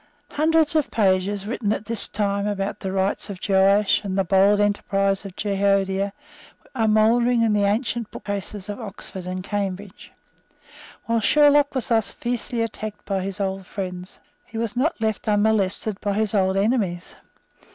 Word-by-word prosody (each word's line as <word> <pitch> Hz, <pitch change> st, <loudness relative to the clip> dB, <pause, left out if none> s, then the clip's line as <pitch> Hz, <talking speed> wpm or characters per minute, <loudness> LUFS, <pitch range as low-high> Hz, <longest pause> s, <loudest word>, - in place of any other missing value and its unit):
Hundreds 320 Hz, +1 st, +2 dB
of 305 Hz, -3 st, +2 dB
pages 195 Hz, -1 st, +1 dB
written 210 Hz, -1 st, -2 dB
at 215 Hz, -, -2 dB
this 225 Hz, -1 st, +2 dB
time 200 Hz, -1 st, -1 dB
about 200 Hz, -1 st, -3 dB
the 190 Hz, -, -4 dB
rights 195 Hz, +2 st, 0 dB
of 195 Hz, -3 st, -6 dB
Joash 195 Hz, +1 st, +3 dB
and 195 Hz, -1 st, -3 dB
the 195 Hz, -, +3 dB
bold 195 Hz, +3 st, +4 dB
enterprise 195 Hz, -1 st, 0 dB
of 190 Hz, -2 st, -8 dB
Jehoiada 195 Hz, -1 st, 0 dB, 0.6 s
are 225 Hz, -4 st, +1 dB
mouldering 230 Hz, +2 st, +3 dB
in 220 Hz, -2 st, +2 dB
the 205 Hz, -1 st, +2 dB
ancient 225 Hz, +2 st, -1 dB
bookcases 200 Hz, -1 st, -6 dB
of 205 Hz, +2 st, -5 dB
Oxford 190 Hz, -3 st, -8 dB
and 185 Hz, 0 st, -4 dB
Cambridge. 200 Hz, -1 st, -5 dB, 0.9 s
While 230 Hz, 0 st, +1 dB
Sherlock 290 Hz, +5 st, +4 dB
was 260 Hz, -, -2 dB
thus 225 Hz, -3 st, +3 dB
fiercely 240 Hz, -1 st, -3 dB
attacked 215 Hz, -1 st, -6 dB
by 195 Hz, -1 st, -1 dB
his 195 Hz, +1 st, -5 dB
old 190 Hz, -1 st, -3 dB
friends, 180 Hz, -1 st, -6 dB, 0.3 s
he 225 Hz, -, -8 dB
was 230 Hz, 0 st, -2 dB
not 285 Hz, +6 st, 0 dB
left 220 Hz, -2 st, -2 dB
unmolested 205 Hz, -1 st, +1 dB
by 205 Hz, -1 st, -1 dB
his 215 Hz, 0 st, 0 dB
old 190 Hz, -2 st, +2 dB
enemies. 195 Hz, -5 st, -1 dB
205 Hz, 160 wpm, -23 LUFS, 195-225 Hz, 0.9 s, bold